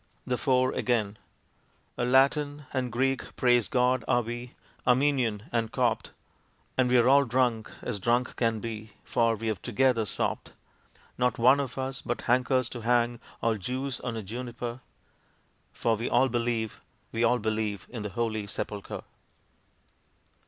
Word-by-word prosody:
The 125 - 0
Four 130 -1 +2
again 110 -4 0 0.8
A - - -2
Latin 145 +3 +3
and 130 -3 -1
Greek, 135 +2 -1
praise 120 -3 +3
God, 125 -1 +2
are 120 - +3
we, 120 +2 -6 0.3
Armenian 125 -5 +2
and 115 -2 0
Copt, - - 0 0.7
And 130 -1 +3
we're 125 -1 +5
all 140 +2 +6
drunk 120 -3 0
as 110 -5 -3
drunk 120 +5 +1
can 115 -2 +1
be, 110 -1 -6
for 115 -1 +2
we've 110 -3 -3
together 120 -1 +2
sopped. - - -2 0.7
Not 125 -1 +2
one 130 +4 +6
of 135 -2 -3
us 130 0 -3
but 120 - -3
hankers 130 +1 +2
to 120 - -7
hang 120 0 +2 0.2
all 115 -1 +2
Jews 130 +5 -3
on 120 -2 -4
a 110 - -4
Juniper, 120 +3 -5 0.9
For 115 -1 +1
we 115 +3 -3
all 135 - +4
believe, 115 -2 -1 0.3
we 115 +1 0
all 120 +1 +4
believe, 105 -4 -2
in 120 -3 -6
the 105 - -4
Holy 110 0 -2
Sepulchre! 100 0 -5
120 Hz, 145 wpm, -28 LUFS, 115-130 Hz, 0.9 s, all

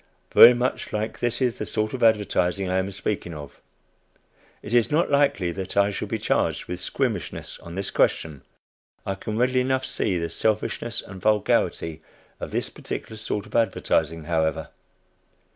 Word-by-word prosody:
Very 120 +1 +10
much 125 +1 -2
like 110 +1 -3
this 120 +2 0
is 125 -2 0
the - - -2
sort 110 0 -1
of 130 - -4
advertising 100 -4 +2
I 95 +1 +1
am 95 +1 -2
speaking 95 -3 -3
of. 75 -1 -10 1.0
It 105 - -6
is 120 -2 +4
not 155 +2 +1
likely 140 -11 +2
that 95 +2 -6
I 100 0 +4
shall - - -4
be - - -2
charged - - 0
with 90 0 -5
squeamishness 110 - -3
on 85 0 -10
this 95 0 -3
question. 75 -4 +1 0.6
I 95 - -1
can 105 +2 -5
readily 125 +2 +2
enough 130 +1 0
see 95 -4 -1
the 85 -1 -3
selfishness 110 +1 -1
and 95 -2 -10
vulgarity 95 -6 +1 0.4
of - - -5
this - - -1
particular 110 - -6
sort 105 -1 -3
of - - -12
advertising, 80 -8 +1
however. 80 -1 -1
105 Hz, 165 wpm, -24 LUFS, 90-115 Hz, 1.0 s, Very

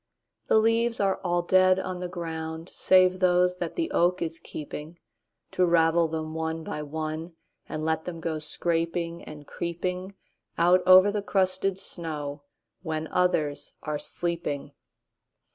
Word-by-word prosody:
The - - +4
leaves 230 +1 +2
are 195 -1 +2
all 175 -1 +1
dead 185 +1 +5
on 185 -1 -4
the 180 - -3
ground, 165 -1 -5
Save 185 0 +4
those 180 0 +3
that 175 -2 -4
the 335 -1 -1
oak 180 +1 +2
is 165 0 -3
keepingTo 150 +2 -7 0.6
ravel 170 -1 +4
them 155 0 -4
one 160 0 -3
by 150 - -4
oneAnd 155 +2 -4 0.4
let 160 +1 -1
them 170 -2 -5
go 160 -1 -2
scraping 170 +2 -2
and 150 -1 -10
creepingOut 180 +2 -3 0.5
over 185 +3 +6
the 205 0 -1
crusted 190 -1 0
snow, 150 -6 -6 0.4
When 160 -2 -3
others 150 -5 0
are 150 -1 -2
sleeping. 165 -5 -4
170 Hz, 130 wpm, -27 LUFS, 160-185 Hz, 0.6 s, over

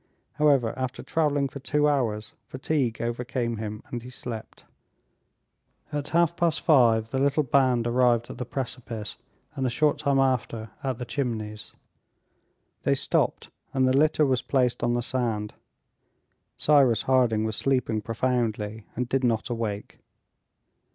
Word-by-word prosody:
However, 140 -6 +3
after 130 -1 -4
traveling 145 -3 +1
for 140 - -9
two 150 +2 +1
hours, 110 -7 0
fatigue 130 -3 -1
overcame 120 0 -2
him, 105 0 -5
and 120 - -3
he 125 - -10
slept. 120 -3 -8 1.3
At 145 -1 -2
half 170 0 +2
past 170 -3 +1
five 115 -7 +4
the 130 - 0
little 140 +2 +2
band 130 -3 +2
arrived 120 -1 +3
at - - -10
the - - -1
precipice, 120 -4 -5 0.4
and 135 - -2
a 130 - +2
short 150 +4 +1
time 140 -2 +1
after 120 -4 0
at 130 -3 -1
the 125 - -5
Chimneys. 110 -3 -4 1.1
They - - +2
stopped, - - -1 0.2
and 130 -1 +3
the 130 - +3
litter 150 +1 +4
was 130 -2 +1
placed 125 -3 +1
on 120 0 +1
the 120 - 0
sand; 115 -5 -2 1.0
Cyrus 135 -7 +4
Harding 125 -5 +3
was 110 -1 -2
sleeping 125 -5 0
profoundly, 110 -2 -2
and 125 +1 -2
did 135 +1 0
not 115 0 0
awake. 110 -3 -4
125 Hz, 145 wpm, -26 LUFS, 115-135 Hz, 1.3 s, five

